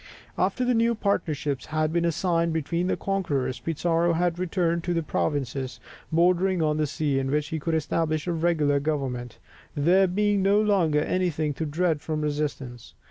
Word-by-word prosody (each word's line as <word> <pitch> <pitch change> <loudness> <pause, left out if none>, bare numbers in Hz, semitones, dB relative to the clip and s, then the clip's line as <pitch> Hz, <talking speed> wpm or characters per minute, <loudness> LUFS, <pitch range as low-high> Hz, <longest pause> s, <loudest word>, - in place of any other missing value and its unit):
After 255 - 0
the 250 - +2
new 230 0 +2
partnership 150 - -1
had 155 0 -1
been 170 0 +2
signed 170 0 0
between 170 +3 -1
the - - 0
conquerors 145 -11 -1
(1534), - - -30 0.4
Pizarro - - +3
had 175 +1 0
returned 170 -2 0
to 175 0 -1
the 165 - 0
provinces 135 -4 -2 0.3
bordering 180 +3 +3
on 155 -1 +1
the 155 -1 +1
sea, 145 -1 -1
in 135 0 -2
which 150 +1 0
he 160 - -3
could 160 +2 -1
establish 155 0 -1
a 175 - -1
regular 160 -4 +2
government, 135 -5 -3 0.4
there 180 +6 +4
being 205 +2 +1
no 200 +2 +4
longer 185 -8 +2
anything 160 -3 0
to 160 +3 -3
dread 160 0 0
from 155 -1 -3
resistance. 145 -5 -4
160 Hz, 175 wpm, -26 LUFS, 150-180 Hz, 0.4 s, there